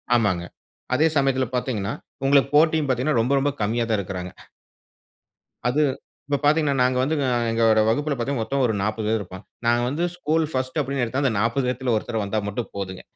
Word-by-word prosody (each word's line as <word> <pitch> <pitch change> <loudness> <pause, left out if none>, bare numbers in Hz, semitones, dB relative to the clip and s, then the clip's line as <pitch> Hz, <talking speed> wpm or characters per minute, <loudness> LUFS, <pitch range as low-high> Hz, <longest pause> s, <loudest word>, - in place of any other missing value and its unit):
ஆமாங்க. 100 -7 +1 0.5
அதே 155 +4 +4
சமயத்தில 135 -2 +2
பார்த்தீங்கன்னா, 110 -5 -2 0.3
உங்களுக்கு 140 0 +4
போட்டியும் 155 -1 +4
பார்த்தீங்கன்னா 130 +1 +1
ரொம்ப 125 +5 +1
ரொம்ப 140 +1 +1
கம்மியா 115 +3 +1
தான் 110 - +2
இருக்கறாங்க. 90 -1 -5 1.4
அது 145 +5 +2 0.5
இப்போ 145 -1 +1
பாத்தீங்கன்னா, 150 -1 +3
நாங்க 125 0 +2
வந்து 145 +5 +1
அ - - +1 0.2
எங்களோட 115 -1 +3
வகுப்புல 145 +6 +1
பாத்தீங்கன்னா, 120 0 -1
மொத்தம் 135 +4 0
ஒரு 110 - 0
40 110 +1 -2
பேர் 110 +1 +2
இருப்பாங்க. 95 0 -9 0.2
நாங்க 120 0 +3
வந்து 150 +6 -1
ஸ்கூல் 160 -2 +1
1 130 +2 -2
அப்படின்னு 135 -1 -1
எடுத்தா, 130 +4 -2
அந்த 130 - +2
40 115 +4 +1
பேர்ல 125 -2 0
ஒருத்தர் 110 0 -2
வந்தா 105 +2 -1
மட்டும் 110 +3 -4
போதுங்க. 95 -1 -5
125 Hz, 180 wpm, -23 LUFS, 110-140 Hz, 1.4 s, அதே